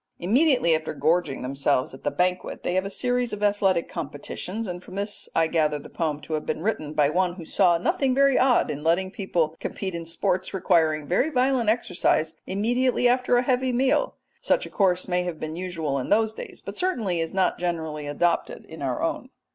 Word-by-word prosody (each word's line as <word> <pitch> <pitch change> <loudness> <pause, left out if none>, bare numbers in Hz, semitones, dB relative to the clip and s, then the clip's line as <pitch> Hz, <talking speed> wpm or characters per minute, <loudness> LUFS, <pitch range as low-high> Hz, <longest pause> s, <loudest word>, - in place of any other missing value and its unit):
Immediately 245 - +3
after 155 0 -4
gorging 155 -2 +1
themselves 135 0 0
at 135 - -12
the 145 - +1
banquet 180 +3 -1
they 175 - -1
have 185 +1 +1
a - - -3
series 245 +3 -1
of 210 0 -4
athletic 195 -4 +2
competitions, 180 +7 -5
and 180 -1 -5
from - - -11
this 205 +1 -3
I 165 - +4
gather 155 -2 +1
the 145 - -12
poem 150 -3 -2
to 155 - -7
have 155 - -1
been 160 - -3
written 155 -8 -2
by 150 -1 +3
one 180 +1 +1
who 170 -3 -9
saw 175 0 +3
nothing 255 +9 +1
very 275 -1 +4
odd 250 - +3
in 150 0 -6
letting 180 +4 +1
people 170 -6 -1
compete 190 -2 -4
in 165 -1 -5
sports 185 +3 -1
requiring 160 -5 +2
very 185 - +1
violent 255 -4 +2
exercise 180 -7 +1
immediately 245 +5 +1
after 250 0 +3
a 245 - +2
heavy 255 0 +1
meal. 265 - +1 0.3
Such - - +1
a - - -10
course 185 -3 +1
may 180 -1 +1
have 175 -3 -4
been 155 0 -5
usual 165 -6 -2
in 130 - -5
those 220 +1 +3
days, - - -9
but - - -6
certainly 225 - 0
is 165 0 -2
not 190 -1 +1
generally 160 -4 -3
adopted 170 +4 -1
in - - -11
our - - -2
own. - - -2
180 Hz, 205 wpm, -25 LUFS, 160-225 Hz, 0.3 s, I